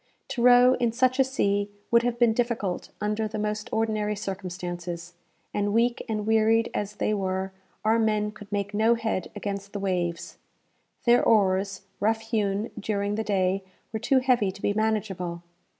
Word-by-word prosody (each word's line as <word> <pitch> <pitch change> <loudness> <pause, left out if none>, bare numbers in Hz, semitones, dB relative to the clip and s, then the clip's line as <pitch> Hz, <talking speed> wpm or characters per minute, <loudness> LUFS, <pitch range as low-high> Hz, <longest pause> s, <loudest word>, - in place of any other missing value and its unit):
To 240 - -3
row 250 +1 +7
in 240 -2 +2
such 255 +2 +2
a - - +7
sea 205 -6 0 0.2
would 235 0 +6
have 240 0 -1
been 235 -2 +4
difficult 225 -6 -1
under 210 +1 -1
the 215 +1 -5
most 210 0 -2
ordinary 215 -1 0
circumstances; 180 -3 -5 0.4
and, 205 0 0
weak 235 +1 +2
and 215 -1 -2
wearied 225 +1 +3
as 205 0 -3
they 215 - 0
were, 190 -1 -2 0.3
our 225 +1 +4
men 215 -1 +1
could 210 -1 -13
make 205 0 -2
no 220 +3 +4
head 225 -5 -2
against 200 -1 -5
the 205 - -3
waves. 180 -3 -2 0.7
Their 240 0 +5
oars, 195 -3 +2 0.2
rough 220 +2 +1
hewn 215 -2 -1
during 205 -1 -1
the 220 +1 -1
day, 195 -2 +1 0.3
were 220 - -1
too 260 +4 +2
heavy 250 -6 +3
to 195 +1 -13
be 205 - +2
manageable. 200 -5 -1
210 Hz, 165 wpm, -26 LUFS, 195-225 Hz, 0.7 s, row